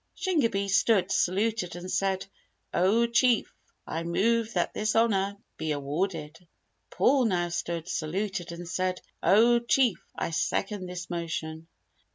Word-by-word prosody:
Shingebis 230 Hz, -, 0 dB
stood, 195 Hz, -3 st, +2 dB
saluted 195 Hz, -1 st, 0 dB
and 180 Hz, +1 st, -6 dB
said, 195 Hz, -1 st, 0 dB, 0.5 s
"Oh 210 Hz, +6 st, +3 dB
Chief! 240 Hz, 0 st, +2 dB, 0.3 s
I 165 Hz, -, -3 dB
move 225 Hz, +7 st, +1 dB
that -, -, 0 dB
this 215 Hz, 0 st, -1 dB
Honour 200 Hz, -3 st, +2 dB, 0.2 s
be 155 Hz, -1 st, -1 dB
awarded." 150 Hz, +2 st, -3 dB, 0.5 s
Paul 270 Hz, -3 st, +3 dB
now 175 Hz, -5 st, +1 dB
stood, 170 Hz, -1 st, -3 dB
saluted 185 Hz, +2 st, -3 dB
and 170 Hz, 0 st, -7 dB
said, 185 Hz, +1 st, -1 dB, 0.2 s
"Oh 235 Hz, +4 st, +5 dB
Chief! 235 Hz, -2 st, +2 dB
I -, -, -3 dB
second 185 Hz, +4 st, -1 dB
this 180 Hz, 0 st, -7 dB
motion." 165 Hz, -1 st, -4 dB
190 Hz, 130 wpm, -28 LUFS, 170-225 Hz, 0.5 s, Oh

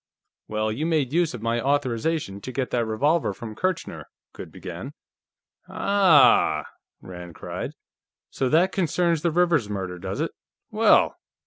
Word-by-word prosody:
"Well, 110 Hz, 0 st, -1 dB
you 150 Hz, +9 st, -2 dB
made 150 Hz, -5 st, 0 dB
use 170 Hz, -5 st, +1 dB
of 115 Hz, -, -9 dB
my 115 Hz, 0 st, 0 dB
authorization 135 Hz, -4 st, -1 dB
to 130 Hz, -, -6 dB
get 130 Hz, 0 st, -3 dB
that 120 Hz, -2 st, 0 dB
revolver 145 Hz, +9 st, +1 dB
from 115 Hz, -3 st, -8 dB
Kirchner 185 Hz, -, -3 dB
" -, -, -67 dB
Goode -, -, -9 dB
began. -, -, -8 dB, 0.8 s
"Aah!" 185 Hz, -10 st, +4 dB, 0.4 s
Rand 90 Hz, -2 st, -9 dB
cried. -, -, -6 dB, 0.6 s
"So 130 Hz, -, -1 dB
that 175 Hz, +6 st, +3 dB
concerns 170 Hz, -2 st, +1 dB
the 170 Hz, -, +1 dB
Rivers 165 Hz, -9 st, +2 dB
murder, 95 Hz, -3 st, -4 dB
does -, -, -5 dB
it? -, -, -1 dB, 0.4 s
Well! -, -, +4 dB
135 Hz, 145 wpm, -24 LUFS, 110-165 Hz, 0.8 s, Aah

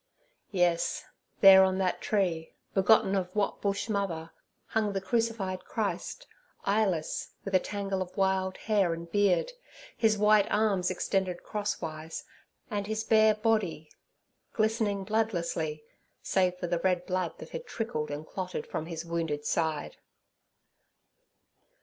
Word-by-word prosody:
Yes, 175 Hz, -3 st, +1 dB, 0.4 s
there, 190 Hz, -1 st, +10 dB
on 190 Hz, 0 st, +2 dB
that 185 Hz, -2 st, 0 dB
tree, 175 Hz, -6 st, 0 dB, 0.2 s
begotten 200 Hz, 0 st, +4 dB
of 185 Hz, -2 st, 0 dB
what 205 Hz, -1 st, 0 dB
Bush—mother, 200 Hz, -5 st, -1 dB, 0.4 s
hung 215 Hz, -2 st, 0 dB
the 195 Hz, -, 0 dB
crucified 200 Hz, -4 st, -1 dB
Christ—eyeless, 210 Hz, -, -2 dB, 0.2 s
with 195 Hz, -, -5 dB
a 185 Hz, -, +6 dB
tangle 195 Hz, -1 st, -3 dB
of 185 Hz, +1 st, -6 dB
wild 190 Hz, -1 st, +1 dB
hair 200 Hz, -6 st, +1 dB
and 170 Hz, 0 st, -9 dB
beard, 205 Hz, -, +2 dB, 0.4 s
His 220 Hz, -2 st, +3 dB
white 210 Hz, 0 st, +5 dB
arms 200 Hz, -4 st, +2 dB
extended 185 Hz, -1 st, -1 dB
crosswise, 165 Hz, -6 st, -4 dB, 0.5 s
and 205 Hz, -1 st, -2 dB
His 220 Hz, 0 st, -2 dB
bare 220 Hz, -1 st, +5 dB
body 215 Hz, -8 st, 0 dB, 0.6 s
glistening 215 Hz, -2 st, +1 dB
bloodlessly, 170 Hz, -8 st, -1 dB, 0.4 s
save 180 Hz, -1 st, +1 dB
for 180 Hz, -, -4 dB
the 175 Hz, 0 st, 0 dB
red 180 Hz, 0 st, +1 dB
blood 185 Hz, -1 st, -2 dB
that -, -, -10 dB
had -, -, -6 dB
trickled 220 Hz, -10 st, -3 dB
and 145 Hz, +2 st, -5 dB
clotted 185 Hz, -2 st, -4 dB
from 160 Hz, -, -4 dB
His 165 Hz, -1 st, -5 dB
wounded 165 Hz, -3 st, -2 dB
side. 160 Hz, -2 st, -1 dB
190 Hz, 125 wpm, -29 LUFS, 170-210 Hz, 0.6 s, there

